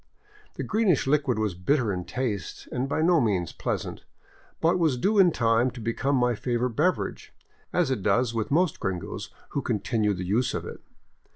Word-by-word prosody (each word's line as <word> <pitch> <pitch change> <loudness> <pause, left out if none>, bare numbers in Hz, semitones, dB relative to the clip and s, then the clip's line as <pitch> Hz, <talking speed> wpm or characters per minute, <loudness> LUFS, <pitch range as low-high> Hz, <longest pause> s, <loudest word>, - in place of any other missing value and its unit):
The - - -4
green 220 -1 +1
ish 160 - +3
liquid 135 -4 +2
was 110 -3 0
bitter 110 +5 +1
in 90 -1 -4
taste 115 -7 -4
and 130 +2 -2
by 155 - 0
no 170 -2 +4
means 95 -7 0
pleasant, - - -4 0.6
but 170 +2 +2
was 155 -7 +2
due 200 - +2
in 185 -2 +7
time 115 -3 +2
to 125 - -10
become 115 +5 0
my 125 -1 +2
favorite 120 +2 -1
beverage, 165 +10 -1 0.4
as 170 -7 +1
it 130 - -1
does 115 +5 +2
with 110 -2 -2
most 170 +4 +2
gringos 95 -2 -4 0.2
who 140 - -2
continue 110 -3 0
the 90 0 -4
use 110 +7 +1
of - - -3
it. - - -8
125 Hz, 185 wpm, -26 LUFS, 110-150 Hz, 0.6 s, in